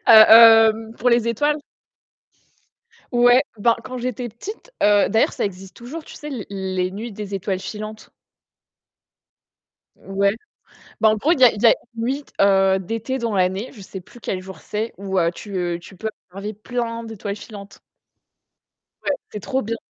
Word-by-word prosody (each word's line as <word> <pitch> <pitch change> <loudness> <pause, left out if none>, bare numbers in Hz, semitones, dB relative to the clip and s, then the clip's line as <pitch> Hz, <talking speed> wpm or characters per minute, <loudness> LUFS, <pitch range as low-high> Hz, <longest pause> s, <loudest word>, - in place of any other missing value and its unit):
a, 225 0 +9
hem, 220 +1 -8
pour 250 - +2
les 235 -1 +3
étoiles. 295 +6 0 1.5
Ouais. 245 +1 +5 0.2
Ben 230 +2 +3
quand 255 0 -7
j'étais 245 -1 -4
petite, 420 - -10
heu, 205 -1 +4
d'ailleurs, 225 - +2
ça - - -1
existe 190 -1 -8
toujours, 280 +8 -8
tu - - -13
sais, 300 - -9
l 245 -7 -5
les 190 -2 -2
nuits 220 +5 -6
des 200 -1 -6
étoiles 190 0 -2
filantes. 215 +2 -8 1.8
Ouais. 200 +1 0 0.7
Ben 220 - +5
en 215 - +1
gros, 295 +10 +2
il 285 - -1
y - - +9
a 245 - +8
il 210 - -7
y - - +6
a - - +7 0.2
une 225 - -4
nuit, 275 +4 -2 0.2
heu, 195 -1 +4
d'été 225 +7 -4
dans 230 -3 -2
l'année, 190 +4 0
je 225 - -14
sais 190 0 -8
plus 210 +6 -17
quel 185 - -3
jour 190 0 -10
c'est, 215 +2 -4
où, 195 -1 -3
heu, 170 0 +2
tu, 200 +2 -8
heu, 175 -1 -1
tu 185 +2 -14
peux 220 +4 -4 0.2
enlever 200 +3 -6
plein 230 +1 -4
d'étoiles 215 -3 -6
filantes. 205 -2 -11 1.2
Ouais, - - 0 0.2
c'est 210 - -6
trop 260 +7 -2
bien. 230 0 -3
215 Hz, 180 wpm, -21 LUFS, 195-235 Hz, 1.8 s, a